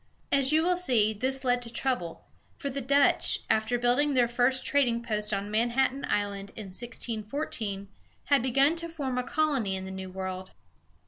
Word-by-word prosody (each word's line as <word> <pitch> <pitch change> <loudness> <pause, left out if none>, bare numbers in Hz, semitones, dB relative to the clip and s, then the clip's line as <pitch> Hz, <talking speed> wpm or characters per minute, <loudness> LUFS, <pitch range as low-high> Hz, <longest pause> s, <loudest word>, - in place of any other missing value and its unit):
As 275 0 +4
you 315 +1 +4
will 360 +1 +2
see, 240 -12 +3
this 260 +5 -2
led 245 -1 +1
to 235 -1 -7
trouble; 235 -9 -3 0.3
for 280 -2 -4
the 275 +1 -3
Dutch, 280 +2 +3
after 220 +2 +1
building 250 +4 +2
their 245 -2 +4
first 245 +2 +1
trading 245 -5 +2
post 210 -2 -2
on 200 0 -2
Manhattan 240 +5 +1
Island, 200 -1 -2
in 210 -3 -8
1614, 220 -1 -4 0.4
had 280 -3 +3
begun 275 +5 +3
to 335 0 -4
form 275 -6 -3
a - - -1
colony 270 -10 0
in 190 0 -5
the 190 - -7
New 190 0 -6
World. 185 0 -6
245 Hz, 175 wpm, -28 LUFS, 210-275 Hz, 0.4 s, As